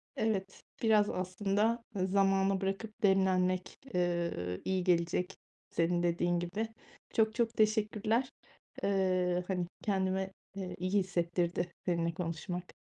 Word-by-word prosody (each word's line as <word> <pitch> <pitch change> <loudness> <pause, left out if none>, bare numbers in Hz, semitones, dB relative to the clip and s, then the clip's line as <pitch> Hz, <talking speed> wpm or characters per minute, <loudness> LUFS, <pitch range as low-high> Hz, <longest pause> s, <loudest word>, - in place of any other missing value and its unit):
Evet, 195 -3 -1 0.2
biraz 215 -2 +4
aslında 205 +5 0
zamana 195 0 +2
bırakıp 210 +4 -3
demlenmek, 185 -2 +2
eee, 170 - -1
iyi 190 -1 +1
gelecek 175 0 +1 0.4
senin 175 +1 +1
dediğin 175 0 +1
gibi. 180 +6 -2 0.5
Çok 220 0 +3
çok 235 -1 +1
teşekkürler. 215 +3 +2 0.5
Eee, 185 -2 +2
hani, 180 -2 -1 0.2
kendimi, 190 -1 0 0.2
eee, 190 -2 -5
iyi 185 +1 -2
hissettirdi 175 -1 0
seninle 170 -2 +1
konuşmak. 175 +1 -4
185 Hz, 105 wpm, -32 LUFS, 175-200 Hz, 0.5 s, biraz